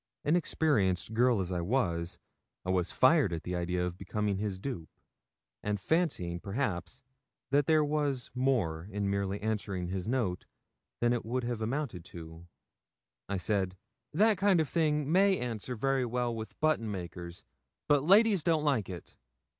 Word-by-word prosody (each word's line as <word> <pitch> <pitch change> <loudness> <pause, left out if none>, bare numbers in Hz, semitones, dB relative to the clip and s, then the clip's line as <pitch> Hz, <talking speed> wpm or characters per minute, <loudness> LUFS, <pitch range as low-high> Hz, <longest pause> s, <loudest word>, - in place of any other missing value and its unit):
Inexperienced 145 - +1
girl 120 -1 +3
as 95 -1 -2
I 90 -1 -1
was, 85 -5 0 0.5
I 95 0 +2
fired 130 - +3
at 85 -1 -4
the 90 - -3
idea 90 +1 -1
of 90 0 -5
becoming 105 -2 -1
his 100 -2 -2
dupe, 95 -6 -5 0.7
and 105 -1 -1
fancying, 95 - 0
perhaps, 100 -3 -3 0.5
that 140 0 +3
there 155 -1 +4
was 145 -4 -1
more 110 -11 0
in 100 0 -1
merely 100 0 -1
answering 100 -5 -2
his 95 +1 -3
note 115 -8 -1 0.5
than 120 0 +3
it 120 - -1
would 125 +3 -2
have 120 -2 -3
amounted 115 - -2
to, 80 0 -10 0.8
I 100 - 0
said 95 -1 0 0.3
'That 210 +5 +3
kind 195 -3 +4
of 160 - +1
thing 150 -1 +1
may 190 +2 +5
answer 125 0 -4
very 135 +2 +1
well 120 0 -1
with 110 -1 -7
button 155 -8 +1
makers, 85 -2 -7 0.4
but 145 -2 +4
ladies 200 +2 +5
don't 160 -2 +2
like 135 -10 +1
it. 90 -2 -9
110 Hz, 155 wpm, -31 LUFS, 90-145 Hz, 0.8 s, may